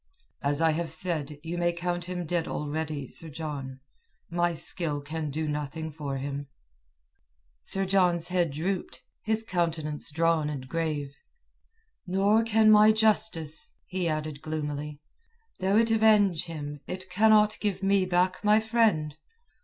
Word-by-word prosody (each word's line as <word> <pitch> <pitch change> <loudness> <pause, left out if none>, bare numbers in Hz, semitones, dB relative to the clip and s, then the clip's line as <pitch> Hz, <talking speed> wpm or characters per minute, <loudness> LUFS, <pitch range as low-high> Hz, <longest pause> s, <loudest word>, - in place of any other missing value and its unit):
"As 145 +3 +1
I 160 - +5
have 165 +1 -2
said, 155 -3 -1
you 170 +1 -4
may 175 0 +2
count 175 0 -3
him 180 -1 -4
dead 170 0 -1
already, 150 -2 -3
Sir 165 - -5
John. 140 -4 -6 0.5
My 175 0 +1
skill 165 -2 -1
can 155 +2 -4
do 155 +2 -3
nothing 150 +2 -4
for 145 -2 -4
him." 140 +1 -5 1.1
Sir 195 0 0
John's 180 -3 +2
head 175 -2 +1
drooped, 175 +6 -3 0.2
his 220 0 -1
countenance 165 -6 -2
drawn 160 0 +1
and 135 -3 -6
grave. 150 -2 -2 0.9
"Nor 200 +4 +3
can 220 -1 +4
my 215 0 +7
justice," 215 -8 +1
he 185 -2 -2
added 155 -1 -3
gloomily. 150 -1 -4 0.6
"Though 190 +2 +2
it 230 0 +3
avenge 210 -6 +4
him, 145 -3 -6
it 185 +1 -6
cannot 215 +2 +4
give 200 -2 -2
me 195 -1 +3
back 185 +1 +1
my 210 +1 +5
friend." 220 -10 +1
165 Hz, 140 wpm, -28 LUFS, 150-195 Hz, 1.1 s, my